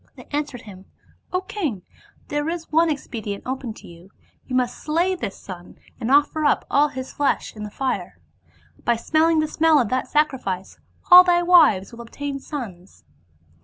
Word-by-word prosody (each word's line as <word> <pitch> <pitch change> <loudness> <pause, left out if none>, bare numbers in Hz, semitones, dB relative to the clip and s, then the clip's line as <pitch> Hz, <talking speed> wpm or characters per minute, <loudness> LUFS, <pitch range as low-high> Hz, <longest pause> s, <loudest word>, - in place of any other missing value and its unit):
They - - -13
answered 290 -4 -3
him, 195 -3 -12 0.2
' - - -34
O 365 - 0
king, 355 - -4 0.5
there 295 +2 -1
is 335 -1 -5
one 325 +2 +4
expe 270 -6 -4
dient 200 -1 -5
open 260 -2 -4
to - - -14
you; 170 +2 -15 0.4
you 255 - -3
must 250 -1 0
slay 335 +5 0
this 345 - -5
son 180 -2 -11 0.2
and 235 -1 -3
offer 290 +3 +3
up 290 - +2
all 290 +2 +4
his 260 -2 -7
flesh 290 -5 -1
in 215 - -9
the 210 - -5
fire. 260 +5 -3 0.7
By 235 - +2
smelling 315 +6 +2
the 310 - -1
smell 315 0 +3
of 235 -6 0
that 255 - -1
sacri 300 -3 +1
fice 190 -5 -5 0.3
all 360 +1 +12
thy 350 -1 +3
wives 310 - +5
will 235 0 -10
obtain 275 +4 -6
sons.' 205 - -8
280 Hz, 185 wpm, -22 LUFS, 225-315 Hz, 0.7 s, all